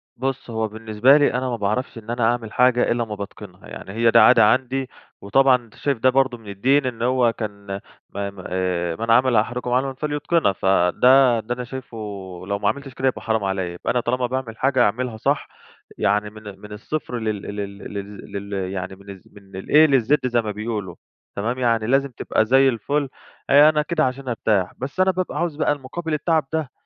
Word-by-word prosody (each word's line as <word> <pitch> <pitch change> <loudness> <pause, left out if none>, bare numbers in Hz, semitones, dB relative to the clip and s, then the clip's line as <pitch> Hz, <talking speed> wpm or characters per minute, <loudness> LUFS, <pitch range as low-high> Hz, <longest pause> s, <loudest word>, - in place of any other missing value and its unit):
بُصّ، 130 0 -4
هو 110 -1 -1
بالنسبة 110 +5 +3
لي 145 - +2
أنا 130 +1 -1
ما 120 - -1
باعرفش 110 +4 -2
إن 115 0 -11
أنا 120 0 -1
أعمل 115 -1 0
حاجة 125 -1 +3
إلّا 120 0 +1
امّا 110 -2 -6
باتقِنها، 100 -2 -10
يعني - - -9
هي 115 0 +3
دي - - +6
عادة 115 -3 +7
عندي، 130 +3 +1 0.3
وطبعًا 130 +6 +4
أنت 115 -3 -8
شايف 140 -3 -1
ده 130 +3 +3
برضه 130 -2 +1
من 110 - -17
الدين 130 +8 +1
إن 120 -3 -4
هو 125 -1 +2
كان 100 -3 -7 0.4
م - - -8 0.2
م 90 - -10
آآ، 90 -2 -1
من 115 +3 -2
عمل 125 +1 +4
أحدُكم 120 +3 0
عملًا 130 +2 +1
فليتقنه، 150 - 0
فده 115 +8 +4
ده 110 +3 -4
أنا 125 - -5
شايفُه 130 -1 -8 0.5
لو 100 0 -2
ما 100 0 +1
عملتش 140 -2 -5
كده 130 - -1
يبقى 130 - -1
حرام 110 -2 -1
عليَّ، 95 -2 -2
يبقى 85 - -3
أنا 125 - +1
طالما 125 +1 -1
باعمل 125 -3 -4
حاجة 130 -1 +2
أعملها 115 +2 -1
صح - - 0 0.5
يعني 105 +1 +1
من 110 0 -13
ال 100 -2 -10
من 105 - -11
الصفر 120 +3 -4
لل 110 -3 -3
لل 100 -1 -5
للز 100 0 -8
ل 100 +1 -7
يعني 95 -1 -4
من 100 +1 -16
الز 95 -2 -10
من 100 -2 -16
الA 140 -6 +4
للz 140 0 +2
زي 120 -1 +1
ما 110 -2 -4
بيقولوا، 105 -4 -5 0.4
تمام؟ 115 +5 -2
يعني 115 -3 +1
لازم 135 +2 +2
تبقى 110 - 0
زي 135 +3 +5
الفل 140 +4 -1 0.4
آآ، 145 +2 +7
أنا 150 -1 +1
كده 155 -2 0
عشان 130 +1 -4
أرتاح. 105 -6 0
بس 135 +8 -6
أنا 190 0 +4
بابقى 180 -4 -3
عاوز 170 -3 -1
بقى 155 - +1
المقابل 145 +4 -4
التعب 155 0 +1
ده، 155 -6 -2
120 Hz, 205 wpm, -22 LUFS, 105-135 Hz, 0.5 s, عادة